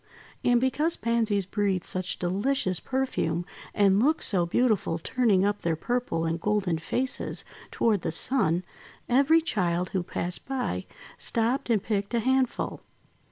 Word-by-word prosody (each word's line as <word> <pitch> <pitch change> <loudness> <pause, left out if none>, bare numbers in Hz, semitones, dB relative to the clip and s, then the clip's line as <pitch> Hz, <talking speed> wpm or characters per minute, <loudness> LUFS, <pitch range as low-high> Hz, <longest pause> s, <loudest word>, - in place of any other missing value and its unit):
And 245 -1 +4
because 295 +6 +1
Pansies 225 -4 +1
breathed 195 -2 0
such 185 0 -3
delicious 185 +1 0
perfume, 215 -11 -1 0.3
and 200 0 +3
looked 305 +5 +2
so 175 -4 +1
beautiful 215 -5 +1
turning 200 +1 +2
up 205 0 0
their 165 -1 0
purple 205 -3 -1
and 165 +1 -2
golden 200 -5 0
faces 255 +10 -2 0.2
toward 210 -5 +1
the 165 - -2
Sun, 185 -2 +1 0.4
every 280 +6 +4
child 180 - 0
who 190 - -1
passed 175 0 -2
by 250 - -2 0.3
stopped 235 +4 0
and 220 -4 +2
picked 205 +1 -1
a - - +3
handful. 260 +2 0
205 Hz, 140 wpm, -27 LUFS, 180-250 Hz, 0.4 s, And